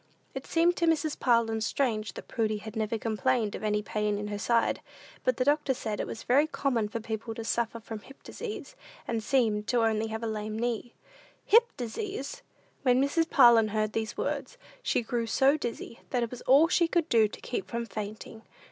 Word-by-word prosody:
It - - -6
seemed 345 +1 +3
to 340 - +1
Mrs. 315 -2 +1
Parlin 230 -2 +2
strange 215 -4 -1
that - - -9
Prudy 215 -3 0
had 215 +2 -9
never 220 0 -1
complained 225 0 0
of - - -6
any 210 0 0
pain 210 -1 -1
in 210 0 -4
her 205 -1 -4
side; 235 +2 +1 0.4
but 255 -2 +1
the 255 - +1
doctor 290 -2 +2
said 215 -3 -4
it - - -2
was 225 - -7
very 280 +5 +4
common 250 -8 0
for 230 - -3
people 225 0 -5
to 225 - -5
suffer 230 0 -1
from 220 -1 -7
hip 270 +6 -16
disease, 450 -2 -7 0.3
and 230 -1 -1
seem 225 -4 +2
to 240 +1 +2
have 225 - +4
only 220 0 -2
a 220 - -2
lame 215 -1 -4
knee. 240 0 -2 0.5
"Hip 470 +3 +6
disease!" 280 - -5 0.4
When 250 -1 +4
Mrs. 325 +4 +1
Parlin 230 -2 +7
heard 215 0 -1
these 220 -1 -3
words, - - -3 0.2
she 245 - 0
grew 230 0 -2
so 270 +5 +4
dizzy, 235 -4 -5
that 245 -2 0
it 230 - -3
was 250 - -7
all 280 +5 +7
she 340 0 +3
could 335 -1 +1
do 225 -5 +4
to - - -11
keep 395 - -4
from 235 0 -3
fainting. 215 0 -7
230 Hz, 200 wpm, -29 LUFS, 220-270 Hz, 0.5 s, Parlin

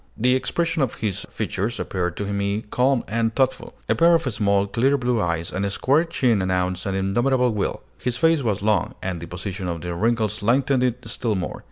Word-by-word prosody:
The 125 +3 +3
expression 165 +5 0
of 130 -5 0
his 105 -5 -3
features 110 +5 -3
appeared 90 -2 -2
to 100 - -2
me 100 +1 -1
calm 130 0 +2
and 115 +1 0
thoughtful. 130 -1 0
A - - +3
pair 170 0 +5
of 165 - +1
small, 100 -5 +1
clear 130 +7 +2
blue 120 -3 0
eyes 85 -1 -2
and 95 - -1
a 100 - 0
square 140 - +2
chin 125 - +1
announced 90 0 -1
an 95 - -1
indomitable 120 +6 +2
will. 105 - -2 0.2
His 125 -1 -2
face 165 +2 +3
was 105 -5 -1
long, 105 -4 +1
and 90 -3 -3
the 85 - -7
position 90 +1 -5
of 85 -2 -3
the 90 +1 -4
wrinkles 110 +2 0
lengthened 130 +4 +2
it 125 -1 -1
still 115 -4 -1
more. 90 -2 -4
110 Hz, 205 wpm, -23 LUFS, 95-125 Hz, 0.2 s, pair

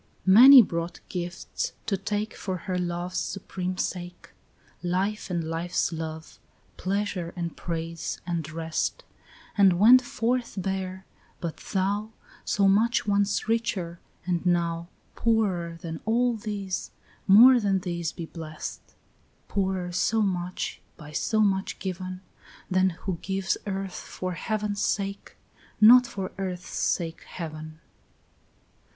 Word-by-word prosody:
4 190 - +5
Many 255 +4 +11
brought 170 -2 -4
gifts 175 0 -4
to 205 - +1
take 205 +3 -3
For 190 -2 -3
her 185 -2 -1
love's 175 +1 -2
supreme 185 -1 -4
sake, 175 -1 -4 0.5
Life 190 +5 -1
and 175 -2 -1
life's 165 +2 -1
love, 160 0 -6 0.4
pleasure 190 -3 -2
and 170 -2 -4
praise 165 -1 -4
and 170 -3 -3
rest, 160 0 -2 0.5
And 195 -4 +5
went 240 +7 +8
forth 245 0 -1
bare; 190 0 -3 0.3
but 170 -2 -4
thou, 205 +3 -2 0.3
So 200 -1 +2
much 230 +6 +3
once 200 0 +1
richer, 215 -7 -1 0.3
and 175 -2 -1
now 170 -1 0 0.3
Poorer 190 -7 0
than 160 -1 -6
all 240 +2 +2
these, 205 -4 -4 0.4
more 240 +6 +9
than 195 -3 +1
these 170 -2 -3
be 170 - -6
blest; 160 -1 -7 0.7
Poorer 190 -2 -1
so 215 +5 +2
much, 180 -2 -2 0.2
by 150 -2 -11
so 215 +7 +1
much 195 -2 +1
given, 185 -1 -5 0.5
Than 185 0 +4
who 185 -4 -3
gives 190 0 -1
earth 195 -1 -3
for 185 0 -5
heaven's 205 +3 -2
sake, 200 -1 -2 0.4
not 245 +3 +8
for 190 -4 -5
earth's 180 -2 -4
sake 165 -1 -1
heaven. 155 -1 -8
185 Hz, 125 wpm, -27 LUFS, 170-205 Hz, 0.7 s, Many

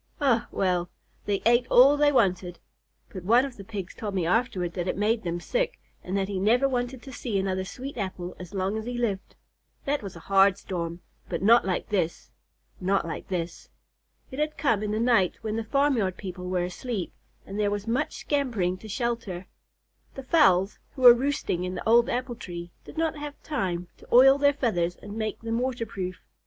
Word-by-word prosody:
Eh, 260 -6 +3
well! 180 -2 0 0.4
They 200 -1 -1
ate 240 +1 +4
all 270 +4 +7
they 290 0 +4
wanted, 185 -8 +1 0.5
but 185 - -8
one 235 +7 +4
of 270 -3 -7
the 200 - -10
Pigs 195 -3 -6
told 210 -4 -5
me 180 -3 0
afterward 185 -3 0
that 180 -1 -3
it - - -1
made 215 +2 +1
them 175 -1 -3
sick, - - -1 0.2
and 185 +2 -2
that 195 -1 0
he 195 -2 -3
never 240 +7 +3
wanted 245 -1 -3
to 265 - -10
see 230 -5 -2
another 190 -1 -1
sweet 255 +8 -7
apple 185 -2 -4
as 180 -2 -9
long 195 +2 -1
as 220 - -7
he 245 0 -4
lived. 210 -6 -2 0.5
That 285 +1 0
was 195 -4 -8
a 165 - -10
hard 195 0 +4
storm, 170 -3 -5 0.3
but 170 0 -3
not 230 +3 +6
like 185 - -2
this, 175 -5 -2 0.5
not 190 0 +1
like 165 - -6
this." 175 -2 -4 0.6
It 260 - -6
had 300 0 -1
come 230 -8 +2
in 210 - -2
the 215 +1 -1
night 230 -6 +3
when 215 -1 -2
the 225 - -2
farmyard 230 -6 +1
people 180 -1 -6
were 180 -1 0
asleep, 190 +2 -4 0.3
and 195 +2 -6
there 205 -1 +2
was 205 0 -3
much 250 +7 -1
scampering 225 -11 0
to 220 - -11
shelter. 220 -5 -3 0.7
The 270 - -7
fowls, 210 - +3 0.2
who 260 - -5
were 245 -1 +12
roosting 250 -8 -1
in 180 0 -3
the 180 - -5
old 235 +1 +5
apple 250 0 -2
tree, 175 -6 -8
did - - -12
not 320 -1 0
have 295 0 -7
time 185 - -2
to - - -17
oil 270 +3 +7
their 285 0 +4
feathers 180 -11 0
and 205 - -10
make 215 -1 -3
them 230 0 -1
water 245 -2 -2
proof. 185 -4 -5
210 Hz, 200 wpm, -27 LUFS, 185-245 Hz, 0.7 s, were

